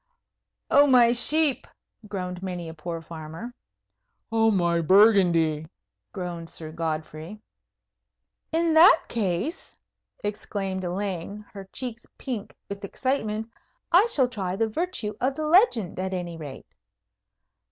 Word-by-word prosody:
"Oh, 285 +1 +7
my 245 -3 +6
sheep!" 285 +4 +2 0.4
groaned 180 -3 -5
many 180 -3 -5
a 160 - -7
poor 165 +1 -6
farmer. 165 +9 -8 0.8
"Oh, 225 0 +3
my 170 -4 +2
Burgundy!" 170 -5 +4 0.4
groaned 175 -3 -6
Sir 155 -1 -6
Godfrey. 160 +3 -5 1.1
"In 330 0 +2
that 320 +2 +7
case," 215 - -3 0.5
exclaimed 200 -2 -3
Elaine, 195 +2 -4
her 195 -1 -8
cheeks 240 -2 -6
pink 240 -7 -5
with 200 +1 -7
excitement, 220 -1 -2 0.4
"I 375 +7 +6
shall 270 - +3
try 195 -7 -3
the 225 +3 +1
virtue 240 -6 -2
of 265 +2 +1
the 310 - -3
legend, 305 - +3
at 190 0 -2
any 175 -2 -4
rate." 145 -4 -9
200 Hz, 120 wpm, -25 LUFS, 170-245 Hz, 1.1 s, Oh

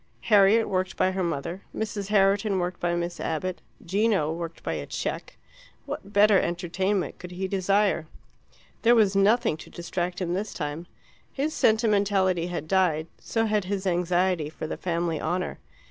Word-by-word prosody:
Harriet, 210 +3 +6
worked 185 0 -1
by 185 - +2
her 190 0 -2
mother; 170 +3 -3
Mrs. 210 -2 -3
Herriton, 200 0 +3
worked 180 0 -2
by 175 0 0
Miss 175 0 -3
Abbott; 180 +3 -3 0.2
Gino, 195 -4 +1
worked 165 0 -6
by 80 - -2
a 75 -2 -5
cheque - - -4 0.5
what 200 - -6
better 205 -1 +5
entertainment 180 +3 -1
could 180 - -8
he 185 +2 -4
desire? 195 -2 +1 0.7
There 240 +1 +5
was 205 -4 +4
nothing 210 -2 +3
to - - -12
distract 175 +1 -4
him 175 -2 -1
this 200 +3 -3
time; 150 +2 -4 0.4
his 295 +3 -2
sentimentality 200 -5 +2
had 175 -3 -4
died, 165 -4 +1
so 225 -1 -1
had 210 -3 0
his 195 0 -3
anxiety 175 -2 +1
for 155 - -7
the 155 - -4
family 170 -2 -2
honour. 180 +1 -2
185 Hz, 160 wpm, -26 LUFS, 170-200 Hz, 0.7 s, Harriet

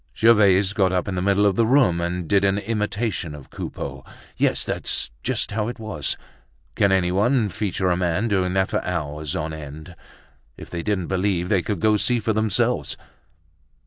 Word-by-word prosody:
Gervaise 100 -4 +5
got 95 -3 +2
up 90 -1 0
in 100 - -2
the 90 - -1
middle 100 +2 +3
of 100 - +4
the 115 - +3
room 120 -10 +4
and 85 0 -2
did 100 +2 +3
an 100 0 +2
imitation 105 -5 -2
of 70 -3 -13
Coupeau. - - -6 0.3
Yes, - - +1
that's - - -3
just - - -1
how 105 0 -1
it 120 - -5
was. 110 - -3 0.6
Can 100 -1 +2
anyone 100 +6 +2
feature 95 -1 -1
a - - +3
man 90 +4 0
doing 95 -4 +1
that 95 0 +1
for - - 0
hours 75 -4 -3
on 80 +1 -3
end? 80 +2 -9 0.6
If - - -11
they 85 - -3
didn't 100 -2 -1
believe 95 -1 0
they 100 -4 +3
could 100 0 -3
go 110 -1 +4
see 120 +3 +1
for 110 0 0
themselves. 110 -1 0
95 Hz, 180 wpm, -23 LUFS, 90-105 Hz, 0.6 s, Gervaise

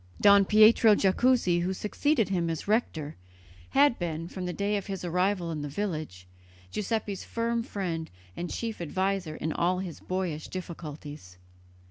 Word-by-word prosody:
Don 200 -1 +7
Pietro 215 +1 +6
Jacuzzi, 195 -2 +3
who 185 +2 -1
succeeded 225 +4 0
him 175 -3 0
as 165 +2 -4
rector, 165 -9 -1 0.5
had 280 -3 +4
been, 165 -1 -3
from 180 0 -5
the - - -2
day 200 +3 -1
of 200 - -3
his 195 -2 -5
arrival 180 0 0
in 155 -2 -4
the 145 - -4
village, 155 - -4 0.5
Giuseppe's 210 -2 -2
firm 230 0 -1
friend 175 -7 -4 0.3
and 175 0 -4
chief 225 -5 -4
adviser 185 0 -1
in 160 0 -3
all 180 +2 +1
his 180 -4 -5
boyish 180 -5 -3
difficulties. 150 - -8
185 Hz, 150 wpm, -28 LUFS, 165-210 Hz, 0.5 s, Don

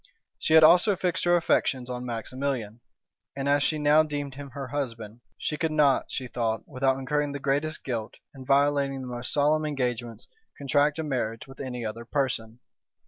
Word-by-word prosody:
She 160 - +2
had 160 - +8
also 180 +6 +6
fixed 180 -1 -1
her 175 0 +5
affections 135 -6 +1
on 125 0 -5
Maximilian; 120 -1 -3 0.6
and 135 0 -3
as 145 0 +3
she 155 +2 +1
now 150 +1 +5
deemed 145 -3 -3
him 140 +1 -8
her 135 0 -7
husband, 120 -5 -5 0.2
she 150 - -3
could 160 0 -1
not, 145 -3 +3
she 130 - -4
thought, 115 -2 -2
without 130 +1 +1
incurring 145 +2 -1
the 140 - -4
greatest 145 +3 -1
guilt, 115 -4 -4 0.2
and 130 -2 -11
violating 140 -1 +2
the - - -7
most 120 0 -4
solemn 150 +2 +2
engagements, 125 -6 -3 0.3
contract 145 +2 +2
a 160 - -2
marriage 120 -6 -3
with 135 0 -14
any 125 -3 -5
other 110 +2 -5
person. 120 -4 -2
135 Hz, 180 wpm, -27 LUFS, 125-145 Hz, 0.6 s, had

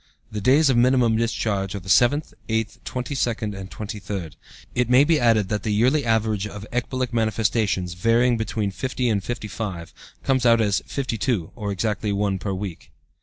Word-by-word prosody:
The 105 -1 -4
days 135 +6 +5
of 120 - +2
minimum 120 -2 +4
discharge 105 -4 -1
are - - -3
the 95 - -15
seventh, 125 - +3 0.2
eighth, 110 0 -2
twenty 125 +2 -4
second, 115 -5 -1
and 95 -1 -7
twenty 105 0 -6
third." 95 -7 -5 0.4
It 125 -1 0
may 125 +2 +6
be 155 0 +3
added 115 -4 +3
that 105 -1 -1
the 110 - -2
yearly 130 +6 +3
average 110 -3 +1
of 105 0 -8
ecbolic 125 0 -2
manifestations, 110 -4 0
varying 115 +6 +3
between 110 -2 -2
50 125 +3 -2
and 100 -3 0
55, 105 -7 -5 0.3
comes 130 -2 +1
out 115 -1 +5
as 105 -3 +2
52, 115 - -2
or 105 -3 -3
exactly 105 +1 -1
one 100 -1 0
per 100 - -3
week. 95 -3 -6
110 Hz, 175 wpm, -23 LUFS, 100-120 Hz, 0.4 s, may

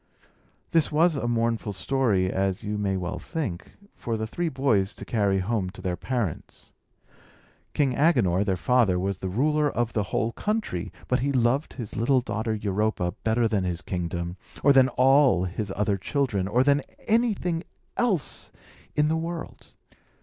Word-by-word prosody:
This 165 -2 +2
was 160 +2 +3
a 125 -4 -2
mournful 115 -2 0
story, 100 -4 +1
as 95 +2 -1
you 105 0 -3
may 100 -2 0
well 90 0 -4
think, 130 - -5 0.2
for 115 -1 -3
the 110 - -2
three 170 +10 -2
boys 130 -9 +1
to - - -9
carry 100 -4 +1
home 95 0 -1
to 95 - -12
their 95 -2 -2
parents. 115 - -4 1.0
King 140 -4 +2
Agenor, 120 - +3
their 95 -3 0
father, 115 -3 +3
was 95 +1 -2
the 95 - -3
ruler 150 +8 +2
of 120 -3 -1
the 105 - +1
whole 115 - 0
country; 210 - -2 0.2
but 125 - +1
he 140 +3 0
loved 130 +3 +1
his 115 -6 -7
little 130 +4 +3
daughter 110 -2 -2
Europa 105 -3 -1
better 115 +1 +2
than 105 -4 0
his 85 -3 -3
kingdom, 85 0 -3 0.3
or 140 - +6
than 130 -1 +6
all 135 -6 +4
his 95 +2 -4
other 105 -1 +1
children, 110 -6 -1
or 120 +5 +3
than 145 +1 +3 0.3
anything 210 -7 +1 0.3
else 205 - 0 0.5
in 150 0 +3
the 160 - +1
world. 165 0 -5
115 Hz, 165 wpm, -26 LUFS, 95-140 Hz, 1.0 s, or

